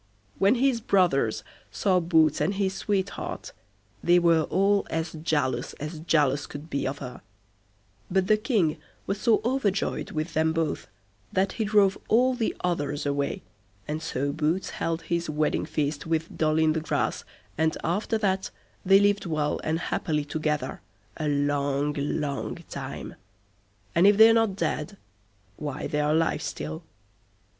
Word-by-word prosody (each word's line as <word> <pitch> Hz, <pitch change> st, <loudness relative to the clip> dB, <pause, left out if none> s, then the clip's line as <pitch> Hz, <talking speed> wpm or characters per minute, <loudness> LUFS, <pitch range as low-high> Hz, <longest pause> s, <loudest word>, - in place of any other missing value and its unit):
When 200 Hz, +5 st, +5 dB
his 255 Hz, -2 st, +2 dB
brothers 140 Hz, -, +2 dB, 0.3 s
saw 185 Hz, -, +2 dB
Boots 160 Hz, -4 st, +3 dB
and 185 Hz, +7 st, +1 dB
his 195 Hz, -1 st, 0 dB
sweetheart, 200 Hz, 0 st, -3 dB, 0.5 s
they 175 Hz, +1 st, +5 dB
were 165 Hz, -2 st, +4 dB
all 200 Hz, +2 st, +2 dB
as 160 Hz, 0 st, -2 dB
jealous 155 Hz, -4 st, -1 dB
as 155 Hz, +2 st, -6 dB
jealous 145 Hz, -3 st, +1 dB
could 145 Hz, +3 st, -9 dB
be 140 Hz, -, -1 dB
of 135 Hz, +2 st, -3 dB
her; 125 Hz, -3 st, -8 dB, 0.9 s
but 190 Hz, 0 st, +2 dB
the 215 Hz, -, +4 dB
King 210 Hz, -, +1 dB, 0.3 s
was 195 Hz, +1 st, -3 dB
so 225 Hz, -3 st, +3 dB
overjoyed 235 Hz, -6 st, 0 dB
with 155 Hz, +2 st, -3 dB
them 160 Hz, +1 st, +2 dB
both, 165 Hz, -1 st, -2 dB, 0.4 s
that 190 Hz, +1 st, +1 dB
he 220 Hz, -, -2 dB
drove 200 Hz, -2 st, +3 dB
all 250 Hz, +4 st, +4 dB
the 240 Hz, -3 st, -1 dB
others 145 Hz, -5 st, -1 dB
away, 145 Hz, +6 st, -1 dB, 0.4 s
and 155 Hz, +1 st, -3 dB
so 140 Hz, -3 st, -2 dB
Boots 155 Hz, +5 st, -1 dB
held 165 Hz, 0 st, -2 dB
his 170 Hz, -1 st, -2 dB
wedding 155 Hz, 0 st, 0 dB
feast 145 Hz, +1 st, -2 dB
with 165 Hz, 0 st, -1 dB
Doll 155 Hz, 0 st, +2 dB
i' 160 Hz, -1 st, +4 dB
the 160 Hz, 0 st, -1 dB
Grass, 155 Hz, -, -1 dB, 0.3 s
and 160 Hz, +1 st, +1 dB
after 205 Hz, +6 st, 0 dB
that 190 Hz, -3 st, 0 dB, 0.3 s
they 195 Hz, +1 st, +6 dB
lived 205 Hz, -1 st, +2 dB
well 155 Hz, -2 st, 0 dB
and 160 Hz, +1 st, 0 dB
happily 155 Hz, -3 st, -1 dB
together 150 Hz, 0 st, -2 dB, 0.4 s
a 155 Hz, -, -2 dB
long 145 Hz, 0 st, 0 dB
long 145 Hz, -1 st, -2 dB, 0.2 s
time, -, -, -6 dB, 0.8 s
and 175 Hz, +4 st, +5 dB
if 205 Hz, 0 st, +5 dB
they're 225 Hz, +1 st, +8 dB
not 225 Hz, -4 st, +2 dB
dead, 195 Hz, 0 st, -2 dB, 0.6 s
why 150 Hz, -1 st, -4 dB
they're 150 Hz, 0 st, 0 dB
alive 160 Hz, +2 st, +2 dB
still. 75 Hz, +1 st, -5 dB
160 Hz, 150 wpm, -26 LUFS, 150-195 Hz, 0.9 s, they're